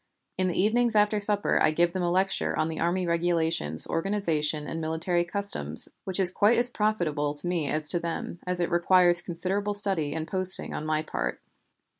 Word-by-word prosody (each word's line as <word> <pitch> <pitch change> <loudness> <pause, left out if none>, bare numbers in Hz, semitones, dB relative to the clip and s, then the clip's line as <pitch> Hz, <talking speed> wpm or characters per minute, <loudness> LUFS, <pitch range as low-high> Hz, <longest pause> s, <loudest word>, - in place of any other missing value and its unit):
In 185 - -1
the 180 - -3
evenings 225 +3 +1
after 210 0 +2
supper 205 0 +2
I - - +3
give 170 +2 0
them 185 - -3
a 175 - -1
lecture 190 +2 -1
on 155 - -1
the 160 - -6
Army 180 +2 -1
Regulations, 165 - +1
organization, 165 -5 -2
and 165 +2 -6
military 160 +2 -2
customs, 175 - -1 0.2
which 190 0 -4
is 185 -2 +2
quite 210 +5 +2
as 245 +1 +5
profitable 165 -10 -2
to 145 - +4
me 170 -5 -2
as 155 0 -2
to 175 - +4
them, 170 0 -6
as 180 0 -3
it 175 - -2
requires 175 0 +3
considerable 190 +4 -4
study 185 -8 +2
and 160 0 -5
posting 185 +1 +5
on 155 - -6
my 155 0 -1
part. 60 - -5
175 Hz, 190 wpm, -25 LUFS, 160-195 Hz, 0.2 s, as